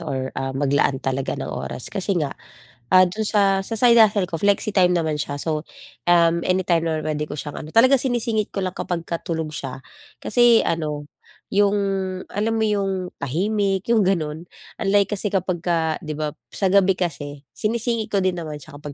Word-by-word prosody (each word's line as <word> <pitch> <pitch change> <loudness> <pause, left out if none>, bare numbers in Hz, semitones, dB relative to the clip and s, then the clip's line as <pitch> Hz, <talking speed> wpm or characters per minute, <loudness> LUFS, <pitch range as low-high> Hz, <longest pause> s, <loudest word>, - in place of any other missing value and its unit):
or 130 -1 -3
ah, 135 0 -3
maglaan 140 0 +1
talaga 135 0 -1
ng - - -5
oras 70 -1 -5
kasi 195 +1 0
nga, 150 -5 -1 0.6
ah, 185 - +8
do'n 210 +5 -3
sa, 195 -2 +2
sa 230 - -4
side 235 0 +6
hustle 205 -4 +5
ko 165 - -3
flexi-time 200 -1 +2
naman 160 -3 0
siya 145 -1 -4
so, 155 -2 -2 0.4
um, 170 -1 +4
anytime 180 -2 +1
naman 160 -1 -1
puwede 150 -1 -1
ko 150 - -7
siyang 145 - -6
ano 155 - -10
talagang 260 +4 +6
sinisingit 235 -4 0
ko 195 - -2
lang 185 -1 -3
kapagka 170 -1 -3
tulog 160 -2 -2
siya 135 -1 -6 0.4
kasi 240 0 +5
ano, 150 -3 -2 0.4
yung 200 0 +3 0.6
alam 215 +3 -1
mo 220 - +2
yung 195 -3 -1
tahimik, 195 +6 0
yung 220 - +4
gano'n. 160 -3 -1 0.4
Unlike 200 +1 +2
kasi 210 - 0
kapagka 175 -4 0
'di 155 -3 -5
ba, 155 -1 -1 0.2
sa 195 - +1
gabi 195 -1 +5
kasi 145 -5 -4 0.2
sinisingit 230 0 -1
ko - - +3
din 185 0 +1
naman 155 -3 -5
siya 145 0 -11
kapag 145 -1 -8
180 Hz, 175 wpm, -22 LUFS, 155-205 Hz, 0.6 s, ah